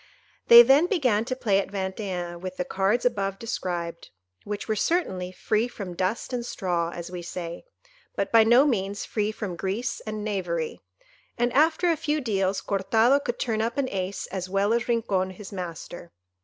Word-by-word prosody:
They 235 0 +11
then 275 +7 +5
began 250 - +1
to 255 +1 -2
play 210 -6 +2
at 195 - -3
Vingt 190 -1 -3
et 205 -2 -3 0.2
un 170 0 -9
with 185 0 -6
the 180 - -1
cards 195 +7 0
above 195 -5 0
described, 175 -6 -4 0.4
which 205 0 -5
were 220 - 0
certainly 190 - 0
"free 215 +4 0
from 200 -7 -7
dust 190 +8 -2
and 245 -1 -1
straw," 175 -7 -1
as 170 0 -7
we 180 -1 -5
say, 170 - -6 0.5
but - - -2
by 225 -1 +7
no 240 +5 +6
means 205 -7 -1
free 210 -1 -1
from 205 -5 -5
grease 195 +7 -2
and 215 -1 -5
knavery; 180 -6 -3 0.6
and 240 0 +1
after 320 +4 +3
a - - +2
few 300 0 -1
deals, 195 -6 0
Cortado 225 +7 +3
could 240 - -2
turn 225 -4 -1
up 230 +3 -2
an 275 -2 +1
ace 190 0 -3
as 185 -1 -4
well 200 +3 +2
as 235 +1 0
Rincon 205 -6 0
his 190 +1 -10
master. 175 -2 -7
205 Hz, 185 wpm, -26 LUFS, 185-235 Hz, 0.6 s, They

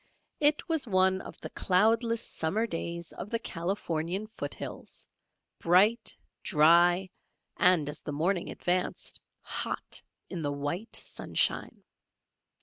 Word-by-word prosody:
It 295 0 +3
was 320 -6 +1
one 190 -1 +3
of - - -10
the - - -7
cloudless 225 +4 +2
summer 195 +8 -1
days 170 -3 -5
of 205 - -7
the 230 - 0
Californian 175 -1 -2
foot 215 - -6
hills, - - -9 0.5
bright, 210 +7 +4 0.2
dry, 175 +3 +5 0.5
and 175 -5 +4
as 150 0 -4
the - - -5
morning 170 +5 0
advanced, 180 0 -2 0.2
hot - - -3 0.3
in 180 -3 -5
the 145 -2 -1
white 145 +10 -3
sunshine. - - -1
185 Hz, 120 wpm, -29 LUFS, 165-215 Hz, 0.5 s, dry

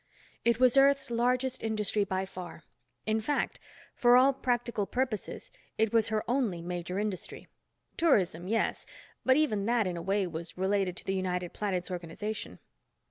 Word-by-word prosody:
It 235 0 +2
was 255 +1 +5
Earth's 275 -1 +4
largest 250 +2 +1
industry 215 -1 0
by 190 -1 -2
far. 180 -4 -9 0.4
In 220 0 +1
fact, 290 +7 -1 0.3
for 245 0 +5
all 265 +2 +6
practical 240 -5 -1
purposes 250 -4 -3 0.3
it 220 0 +2
was 225 -1 +4
her 215 -1 0
only 235 -8 0
major 180 +1 -4
industry. 205 -2 -4 0.5
Tourism, 185 - +2
yes, 225 +3 0 0.4
but 260 +1 +4
even 215 -10 +1
that, 235 -2 +2
in 180 -2 -2
a - - -4
way, 195 +2 +1
was 170 0 -7
related 190 -1 0
to - - -7
the 190 - -1
United 180 -2 -2
Planets 185 -3 -2
organization. 180 +5 -5
210 Hz, 155 wpm, -30 LUFS, 185-245 Hz, 0.5 s, all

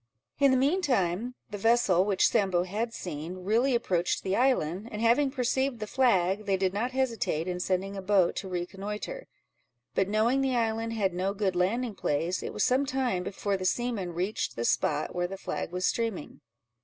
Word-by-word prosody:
In 280 -1 +6
the 260 - +4
mean 290 +9 +2
time, 235 - 0 0.2
the 205 - -5
vessel 225 -5 +4
which 195 -1 +3
Sambo 190 -5 +2
had 215 +6 -3
seen, 175 -1 -6
really 235 +7 +2
approached 180 -7 0
the 190 0 0
island, 220 - +1
and 210 - -5
having 240 +5 +3
perceived 265 -1 0
the 215 - -3
flag, 210 -5 +2
they 195 -1 +2
did 190 -1 0
not 225 +5 -1
hesitate 230 -11 -1
in 180 -1 -2
sending 190 +2 -1
a 195 - -4
boat 190 -2 +3
to 190 - -4
reconnoitre; 200 - -5 0.7
but 195 - +1
knowing 230 +6 +2
the 265 -2 +1
island 225 -1 0
had 200 -5 0
no 190 +3 -1
good 195 -3 0
landing 220 +6 0
place, 170 +1 -1
it - - -5
was 210 - -1
some 265 +2 +2
time 255 -8 0
before 200 +2 -2
the 185 - -6
seamen 200 -5 -1
reached 185 +5 -2
the 115 - -2
spot 150 +4 0
where 175 0 -1
the 195 +2 -7
flag 180 - -4
was 180 0 -1
streaming. 225 -9 -2
205 Hz, 190 wpm, -28 LUFS, 185-240 Hz, 0.7 s, In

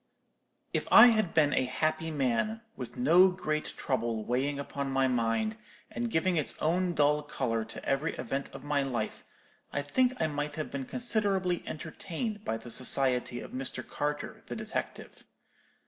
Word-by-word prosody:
"If - - -1
I - - +11
had 215 -6 +1
been 150 -3 +4
a 130 - +2
happy 155 +5 -1
man, 150 - 0
with 120 -2 -8
no 170 +9 +6
great 155 -4 -2
trouble 115 -4 -1
weighing 135 +4 0
upon 140 0 -4
my 135 0 +2
mind, 125 - 0 0.3
and 240 -1 -2
giving 175 -2 +1
its 150 - -1
own 175 +2 +1
dull 150 0 +3
colour 125 -6 -2
to 110 - -9
every 135 +4 0
event 135 +3 -3
of 135 0 -10
my 145 -1 +1
life, 125 -5 -3 0.5
I 145 - -1
think 255 - +1
I - - +2
might 145 -1 -3
have 155 - -4
been 135 -2 -4
considerably 200 - 0
entertained 195 +7 -5
by 115 - -1
the 115 +1 -9
society 125 -1 +2
of - - -9
Mr. 130 -1 -4
Carter, 145 0 -3
the - - -5
detective. - - -5
145 Hz, 160 wpm, -30 LUFS, 130-175 Hz, 0.5 s, I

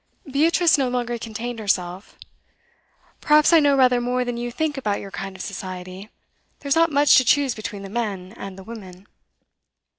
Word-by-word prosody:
Beatrice 320 +3 +3
no 260 -2 +1
longer 240 -1 -2
contained 230 +1 -6
herself. 185 -2 -2 1.0
'Perhaps 300 +2 +4
I 330 - +8
know 285 -2 +3
rather 250 -2 +4
more 250 +1 -1
than 245 -1 -3
you 240 0 -4
think 310 +3 -2
about 215 -7 -2
your 195 - -9
kind 195 0 -6
of 190 - -7
society. 185 0 -7 0.5
There's 280 0 0
not 330 0 +3
much 290 0 +5
to 255 - +5
choose 275 +1 +2
between 210 -2 -7
the - - -7
men 200 -3 -4
and 195 -3 -8
the 190 - -10
women. 190 -4 -11
235 Hz, 175 wpm, -22 LUFS, 195-275 Hz, 1.0 s, I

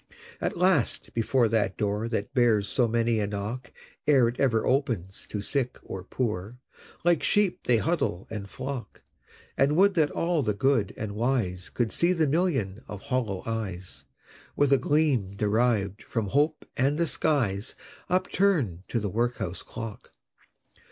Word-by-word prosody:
At - - -1
last, 180 -7 +1
before 120 +1 +2
that 105 -4 +1
door 105 +1 -1
That 115 +2 -3
bears 115 -6 +3
so 120 +4 +2
many 115 0 +1
a 105 - 0
knock 105 +5 -5 0.4
Ere 130 -5 +5
ever 120 -5 +2
it - - -1
opens 115 - -1
to 105 - -3
Sick 125 +3 -1
or 95 - -6
Poor, 105 0 -3 0.5
Like 170 -2 +3
sheep 205 -3 +2
they 120 -2 +5
huddle 135 - -1
and 100 -3 -5
flock 130 -3 -6 0.5
And 140 +2 +3
would 195 +3 +5
that 155 -5 +3
all 170 -2 0
the 105 -6 0
Good 125 -4 +2
and 110 -2 -4
Wise 105 -5 -1
Could 120 -3 -1
see 175 +2 +3
the 165 -3 +2
Million 135 - 0
of 105 - -7
hollow 110 -4 -2
eyes, 100 -6 -5 0.5
With 145 -1 +3
a 135 - +5
gleam 140 -11 +1
deriv'd 105 -1 +1
from 110 -4 -3
Hope 150 +6 +1
and 140 +2 +2
the 170 - +2
skies, 120 -11 0 0.3
Upturn'd 180 - +1
to 120 - -1
the 105 - -2
Workhouse 115 -5 -1
Clock! 115 -3 -8
120 Hz, 155 wpm, -27 LUFS, 105-140 Hz, 0.5 s, Ere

